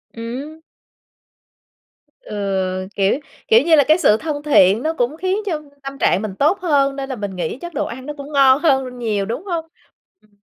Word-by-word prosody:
Ừm. 255 +7 -7 1.6
Ừ, 190 - -3
kiểu, 195 +7 +1 0.3
kiểu 460 +1 +6
như 330 -1 +4
là, 290 - +5
cái 310 +2 +5
sự 215 -11 +4
thân 295 +1 -4
thiện 220 -6 +4
nó 320 - 0
cũng 270 0 -1
khiến 375 +3 -1
cho 325 -6 -2 0.2
tâm 275 0 -7
trạng 195 - +2
mình 210 -3 -5
tốt 305 - +2
hơn 280 -5 +2
nên 275 0 -5
là 260 - -3
mình 205 -4 -5
nghĩ 175 +4 -3
chắc 345 -1 -7
đồ 280 - -1
ăn 255 +2 -8
nó 295 - -5
cũng 285 +1 -9
ngon 270 -1 +5
hơn 265 -6 +1
nhiều, 210 -4 -1
đúng 235 - -5
hông? 340 -4 -3 0.6
Ừm. 210 -1 -31
275 Hz, 195 wpm, -19 LUFS, 210-310 Hz, 1.6 s, kiểu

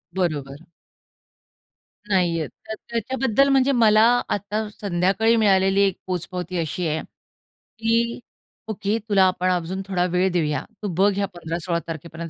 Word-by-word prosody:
बरोबर. 145 -7 -2 1.5
नाहीये 170 -5 +1
त 220 - -10 0.2
त्याच्याबद्दल 260 +3 +1
म्हणजे 270 0 +4
मला 220 -4 +5 0.3
आता 210 +2 -2
संध्याकाळी 200 +3 +1
मिळालेली 195 -2 +3
एक 195 -2 +2
पोचपावती 180 0 -4
अशी 165 +1 -2
आहे, 155 +1 -1 0.8
की 230 +1 +1 0.5
"ओके 210 0 -1
तुला 195 -2 +5
आपण 185 0 0
अजून 180 +2 -2
थोडा 180 -2 0
वेळ 185 +1 +3
देऊया 150 -5 -1 0.2
तू 205 - -1
बघ 200 +2 +4
या 200 - +1
15-16 170 0 -3
तारखेपर्यंत 165 +1 -7
190 Hz, 125 wpm, -23 LUFS, 170-215 Hz, 1.5 s, मला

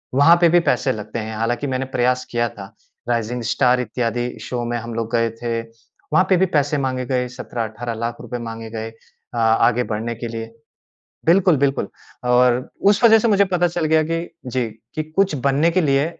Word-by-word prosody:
वहाँ 145 +5 +7
पे 170 - +6
भी 175 - +5
पैसे 135 - +2
लगते 110 -1 -5
हैं। 110 0 -5
हालाँकि 120 +4 -1
मैंने 130 0 -2
प्रयास 125 +1 +1
किया 120 0 +1
था। 100 -1 -11 0.4
राइजिंग 120 +1 -1
स्टार 125 -1 +3
इत्यादि 120 0 -2
शो 120 -1 -4
में 120 0 -2
हम 115 0 -6
लोग 115 0 -3
गए 115 0 +2
थे। 115 -1 -1
वहाँ 115 +9 -2
पे 185 - +5
भी 190 - +4
पैसे 150 -4 +1
माँगे 130 -2 -2
गए, 125 0 -1
₹17,00,000-₹18,00,000 115 -1 -5
रुपए 120 0 -5
माँगे 115 0 -7
गए 110 0 -5 0.4
अ, 120 - -5
आगे 115 +2 +3
बढ़ने 115 +1 -3
के 120 +1 -5
लिए। 115 0 -7 0.7
बिल्कुल, 175 -1 +4
बिल्कुल 140 0 0 0.4
और 125 0 +3 0.2
उस 205 +3 +2
वजह 225 -1 +7
से 230 - +1
मुझे 200 -2 +4
पता 180 -2 +1
चल 170 -1 -2
गया 155 0 +3
कि, 165 +2 -3 0.2
जी, 125 -1 -1 0.3
कि 155 - -1
कुछ 160 +3 0
बनने 145 +5 +3
के 185 - +2
लिए 140 -2 +2
125 Hz, 195 wpm, -21 LUFS, 115-155 Hz, 0.7 s, वहाँ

